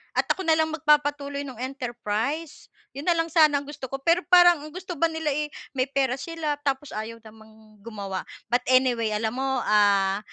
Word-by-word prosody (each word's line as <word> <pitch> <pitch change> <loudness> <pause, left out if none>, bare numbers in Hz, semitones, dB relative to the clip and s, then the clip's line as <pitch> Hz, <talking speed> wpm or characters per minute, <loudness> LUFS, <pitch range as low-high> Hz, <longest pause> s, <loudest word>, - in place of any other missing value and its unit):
at - - +2
ako 380 - -2
nalang 315 -1 +2
magpapatuloy 290 -2 +1
ng 260 - -8
enterprise, 255 +3 -4 0.3
yun 280 +4 -7
nalang 335 -2 +2
sana 310 -3 +5
ang - - -9
gusto 285 -3 -7
ko. - - -2
Pero 335 +3 +4
parang 350 -2 +7
ang 305 - -9
gusto 370 -1 -6
ba 335 - +4
nila 320 -2 -2
eh 300 +2 -1 0.3
may 255 +1 +1
pera 270 -2 0
sila 320 0 -3
tapos 275 0 -2
ayaw 220 +2 -6
namang 220 -1 -17
gumawa. 200 -4 -5 0.3
But 245 - +4
anyway 250 -4 +3
alam 220 +2 -2
mo, 265 -2 -1
ah, 200 -2 +3
270 Hz, 180 wpm, -25 LUFS, 225-305 Hz, 0.3 s, parang